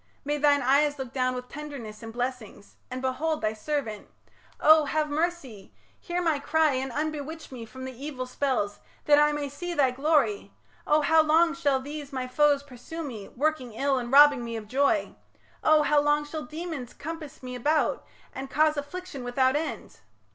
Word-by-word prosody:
May 295 +1 -1
thine 285 -1 +4
eyes 290 +3 +3
look 265 -2 -6
down 255 -1 0
With 250 0 -6
tenderness 275 -8 -8
and 225 -1 -7
blessings, 245 -4 -5
and 255 +1 -5
behold 305 +5 -1
Thy 215 0 0
servant. 220 -2 -4 0.5
Oh! 310 0 +6
have 305 0 -1
mercy; 290 - -3 0.2
hear 355 +1 -3
my 320 -4 +1
cry 315 0 +2
And 260 0 -2
unbewitch 310 +2 -4
me 240 -3 -7
from 260 +2 -9
the 260 - -6
evil 265 0 -6
spells, 250 -6 -1 0.3
That 295 0 +6
I 295 0 +5
may 295 -1 -2
see 345 +5 -5
thy 270 -4 +3
glory... 305 +9 +1 0.3
Oh! 300 +1 +4
how 320 +2 +5
long 325 +2 +4
Shall 290 -6 +1
these 290 +1 -7
my 260 -2 -3
foes 285 +2 +3
pursue 285 +5 -8
me, 225 -9 -7
working 275 -4 -2
ill, 275 +1 +1
And 240 0 -5
robbing 285 -2 +7
me 230 0 -5
of 220 -2 -6
joy?... 280 +6 +1 0.5
Oh! 310 -1 +5
how 295 0 +3
long 295 0 +2
Shall 305 0 -6
demons 310 -5 -6
compass 310 -2 -8
me 250 0 -6
about 295 +5 +1 0.3
and 265 0 -6
cause 305 +2 +2
Affliction 290 -1 -6
without 260 +2 +2
end?... 315 +2 -4
285 Hz, 180 wpm, -27 LUFS, 255-305 Hz, 0.5 s, robbing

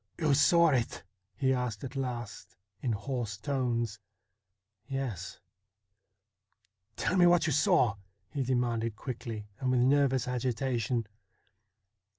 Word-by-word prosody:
' - - -41
You 155 -3 +3
saw 170 +4 +5
it? 125 -5 0 0.2
' - - -53
he 130 -2 +2
asked 125 -4 -2
at 135 0 -6
last 120 -5 -5 0.3
in 125 - 0
hoarse 115 -1 -3
tones. 120 -3 -1 0.9
'Yes.' 110 -9 -4 1.6
'Tell 190 - 0
me 175 -1 +7
what 175 -1 +4
you 160 - +1
saw? 125 -5 +4 0.2
' 95 -2 -45
he 140 - -1
demanded 120 -3 0
quickly 115 -3 -6
and 130 - -1
with 125 -1 +3
nervous 135 -1 +3
agitation. 125 -2 -1
125 Hz, 130 wpm, -30 LUFS, 115-135 Hz, 1.6 s, me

